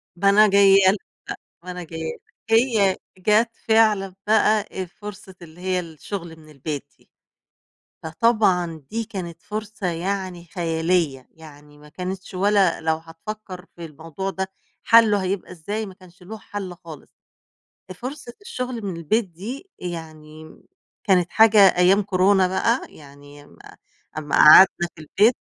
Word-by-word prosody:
با 200 +3 +2
أنا 210 +2 +6
جاية 200 0 +6 0.2
لك، 205 - -2 0.7
أ - - -22
ما 180 - -6
أنا 180 0 -7
جاية 160 0 -7
لك - - -19 0.3
هي 225 -5 +3 0.2
جات 215 +5 +2 0.2
فعلًا 215 -4 +3
بقى 215 0 +3
أ 190 -1 -4
فرصة 195 0 -11
اللي 170 +1 -14
هي 185 0 0
الشغل 170 +1 -7
من 155 -1 -17
البيت 145 0 -6
دي، - - -29 0.9
فطبعًا 180 -3 +1
دي 225 +1 -2
كانت 170 -5 -7
فرصة 215 -2 -5
يعني 180 0 -4
خيالية، 165 -5 -1
يعني 150 -2 -16
ما 150 0 -16
كانتش 185 +4 -7
ولا 195 -1 +2
لو 160 0 +1
هتفكّر 180 +4 -9
في 170 -1 -8
الموضوع 165 +5 -6
ده 190 0 -4 0.4
حَلُّه 220 -4 +5
هيبقى 185 0 -3
إزاي 205 +6 -5
ما 195 - -10
كانش 180 -1 -19
لُه 215 +5 -8
حَلّ 205 -3 -7
خالص، 160 -4 -13 0.8
أ - - -4
فرصة 250 - -8
الشغل 250 - -5
من 190 -4 -4
البيت 215 +8 0
دي 215 - -9
يعني، 155 -2 -9 0.4
كانت 180 -4 +2
حاجة 220 -1 +5 0.2
أيام 185 +3 +4
كورونا 190 0 +3
بقى 230 +6 +1
يعني 145 0 -15
أمّا 85 - -20 0.6
أمّا 150 -2 -2
قعدنا 175 +2 +7
في 160 - -15
البيت 210 +10 +3
185 Hz, 145 wpm, -22 LUFS, 165-210 Hz, 0.9 s, قعدنا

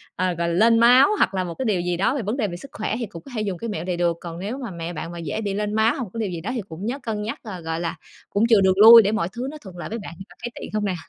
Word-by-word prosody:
ờ, 185 - 0
gọi 170 0 -2
là, - - -1
lên 230 +5 +4
máu 250 - +7
hoặc 195 - +2
là 185 -1 0
một 170 - -5
cái 265 - -3
điều 195 -6 +1
gì 175 -1 -1
đó 225 +8 +1
về 275 - -1
vấn 215 +6 -3
đề 215 -5 0
về 175 -1 -6
sức 275 - -11
khỏe 215 - -2
thì 235 - -2
cũng 170 -5 -10
có 275 - -11
thể 215 - -1
dùng 195 -4 -2
cái 230 +3 -5
mẹo 205 -4 -4
này 180 -2 -2
được. 170 -1 +1
Còn 170 -1 -7
nếu 210 +8 -4
mà 240 -7 -6
mẹ 170 0 -6
bạn 165 +2 -6
mà 170 - -7
dễ 165 +6 -4
bị 200 -2 -2
lên 210 +1 -2
máu 220 +2 +3
hoặc 265 - -3
một 210 - -8
cái 230 - -5
điều 215 - -1
gì 170 - -5
đó 210 +9 -4
thì 235 - -2
cũng 170 +6 -7
nhớ 260 +5 -3
cân 215 -3 -3
nhắc, 215 +2 -4
ờ, 190 -6 -7
gọi 160 0 -3
là, 170 -1 -3 0.3
cũng 215 +3 +2
chừa 215 -4 +6
đường 190 -1 +4
lui 225 +3 +10
để 205 0 0
mọi 215 -6 0
thứ 250 +3 -4
nó 310 - -9
thuận 185 -4 -11
lợi 175 - -6
với 230 - -4
bạn, 185 - -8
bạn 190 - -8
có - - -17
thấy 240 - -2
tiện - - -7
hông 210 -1 0
nè? 185 -2 -1
205 Hz, 375 wpm, -23 LUFS, 175-230 Hz, 0.3 s, lui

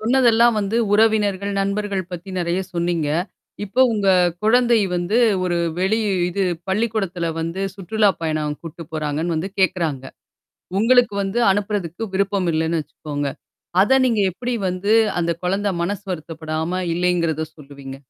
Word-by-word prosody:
சொன்னதெல்லாம் 235 0 +4
வந்து 205 +2 -1 0.2
உறவினர்கள், 205 -2 +2
நண்பர்கள் 200 -1 -1
பத்தி 180 +2 -7
நிறைய 175 +1 0
சொன்னீங்க. 170 -3 -1 0.6
இப்போ 235 +6 -1
உங்க 205 -3 0 0.3
குழந்தை 235 +1 +4 0.2
வந்து 175 +6 0 0.3
ஒரு 175 -1 0 0.2
வெளி 195 +4 +1 0.3
இது 195 +3 -2 0.3
பள்ளிக்கூடத்தில 195 -4 -1
வந்து 165 +3 -3
சுற்றுலாப் 205 +1 +1
பயணம் 155 -2 -1
கூட்டிட்டு 165 0 -9
போறாங்கன்னு 155 +2 -2
வந்து 175 +5 -2
கேட்குறாங்க! 165 -7 0 0.7
உங்களுக்கு 240 +1 +4
வந்து 195 +5 -1
அனுப்புறதுக்கு 200 -2 -2
விருப்பம் 195 -1 0
இல்லன்னு 160 +1 0
வச்சுக்கோங்க! 145 -1 -5 0.5
அத 255 +7 +4
நீங்க 230 -4 +1
எப்பிடி 240 +6 -3
வந்து 185 +4 0 0.3
அந்த 170 0 0
குழந்த 195 +3 0
மனசு 200 +3 -2
வருத்தப்படாம 160 +1 -3
இல்லேங்கிறத 170 -3 0
சொல்லுவீங்க? 140 -2 -10
185 Hz, 125 wpm, -21 LUFS, 165-210 Hz, 0.7 s, சொன்னதெல்லாம்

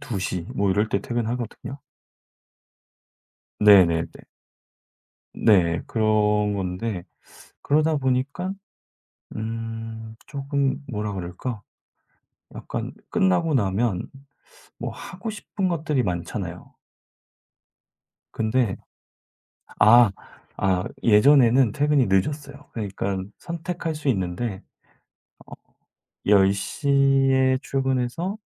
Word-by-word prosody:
2:00 95 -9 -3
뭐 100 -1 +1
이럴 105 +3 +1
때 100 - 0
퇴근하거든요. 120 +3 -4 1.8
네네네. 85 -5 +6 1.3
네, 85 -6 +3
그런 105 -2 +2
건데 95 0 -3 0.6
그러다 155 +1 +2
보니까 140 +8 -1 0.8
음 115 0 -6
쪼끔 140 0 -2
뭐라 105 -2 -3
그럴까? 100 +5 -5 0.9
약간 - - -5 0.2
끝나고 95 - +2
나면 100 -3 0 0.7
뭐 - - -4
하고 225 - -7
싶은 205 -2 -3
것들이 150 -6 0
많잖아요. 90 0 -5 1.6
근데 110 -2 0 1.0
아, 115 0 +7 0.5
아, 95 -2 +1 0.2
예전에는 120 +1 +5
퇴근이 145 -3 +2
늦었어요. 140 +9 -1
그러니깐 100 -2 -4
선택할 170 -1 -4
수 150 -2 -4
있는데 95 0 -2 1.6
어, - - +2
10:00 100 +8 +2 0.4
에 130 0 +3
출근해서 135 - -1
115 Hz, 175 characters per minute, -24 LUFS, 100-140 Hz, 1.8 s, 아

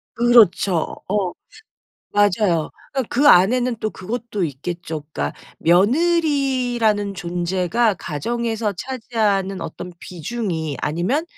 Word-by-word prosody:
그렇죠. 220 -7 +4
어 195 -3 0 0.8
맞아요. 205 -5 +2 0.2
그러니까 265 -1 0
그 285 +4 +4
안에는 240 +6 +5
또 215 0 -3
그것도 215 0 -4
있겠죠. 160 +1 -5
그러니까 70 0 -3 0.2
며느리라는 245 - +2
존재가 180 +5 0
가정에서 220 +7 -2
차지하는 210 -5 -1
어떤 180 - -7
비중이 170 - -4
아니면 180 - 0
205 Hz, 265 characters per minute, -21 LUFS, 175-240 Hz, 0.8 s, 안에는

